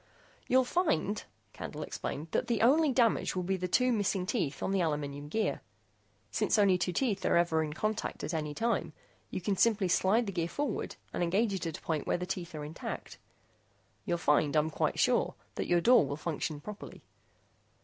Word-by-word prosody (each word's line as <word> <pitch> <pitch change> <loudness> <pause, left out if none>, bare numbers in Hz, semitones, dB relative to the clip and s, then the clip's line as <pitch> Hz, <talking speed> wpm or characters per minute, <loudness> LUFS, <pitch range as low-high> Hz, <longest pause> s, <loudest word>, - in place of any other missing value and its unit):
"You'll 260 +1 +5
find," 215 - 0 0.3
Candle - - -6
explained, 150 +4 -5
"that - - 0
the 230 -3 +1
only 295 +5 +5
damage 235 -6 +2
will 180 - -1
be 190 +2 0
the 180 -1 -2
two 250 +7 +3
missing 200 -4 0
teeth 170 - -2
on - - 0
the 195 -1 +2
aluminum 145 -3 -2
gear. 220 +8 -1 0.7
Since - - +1
only 195 -3 +4
two 180 - 0
teeth 205 0 0
are - - +3
ever 170 -2 +3
in 150 -1 -4
contact 215 +6 -2
at 160 - -3
any 150 -2 -2
time, 230 +1 0 0.4
you - - -4
can 195 +2 0
simply 205 -1 +3
slide 200 +6 +3
the 200 - -3
gear 170 -3 -1
forward 280 +3 -3 0.2
and - - -2
engage 195 +5 +2
it 185 -3 -2
at 160 - -4
a - - -17
point 155 -3 -2
where - - +2
the 180 - -4
teeth 175 -2 -5
are 150 -1 -5
intact. 155 +2 -7 0.8
You'll 175 - 0
find, 150 -2 +2
I'm 155 +1 +2
quite - - 0
sure, - - +2 0.2
that - - -3
your 175 -1 +3
door 245 +2 +6
will 140 +1 -3
function 155 -1 -3
properly. 210 +5 -9
185 Hz, 195 wpm, -31 LUFS, 160-220 Hz, 0.8 s, door